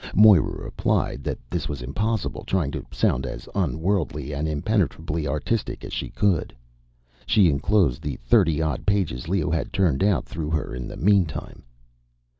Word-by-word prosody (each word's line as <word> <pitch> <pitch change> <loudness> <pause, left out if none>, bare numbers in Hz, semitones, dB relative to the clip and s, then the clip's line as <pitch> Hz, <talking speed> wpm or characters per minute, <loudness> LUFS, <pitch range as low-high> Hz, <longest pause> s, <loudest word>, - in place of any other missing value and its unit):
Moira 105 -4 +5
replied 70 - -1
that - - -2
this 85 -2 -3
was 70 -4 -5
impossible, 100 - -2
trying 85 -8 0
to - - -5
sound 65 - +1
as - - -6
unworldly 80 -4 -1
and 75 +2 -2
impenetrably 80 -1 -1
artistic 75 - -2
as - - -8
she - - -3
could. 95 -11 0 0.7
She 105 -7 +5
enclosed 80 - +2
the - - -3
thirty 85 -9 +2
odd 75 -5 -2
pages 90 -11 0
Leo 85 -3 0
had 80 - -1
turned 95 -7 +2
out 100 -2 +2
through 80 -2 -5
her 80 -4 -2
in 60 -1 -5
the - - -8
meantime. 95 -4 +1
80 Hz, 155 wpm, -24 LUFS, 75-100 Hz, 0.7 s, Moira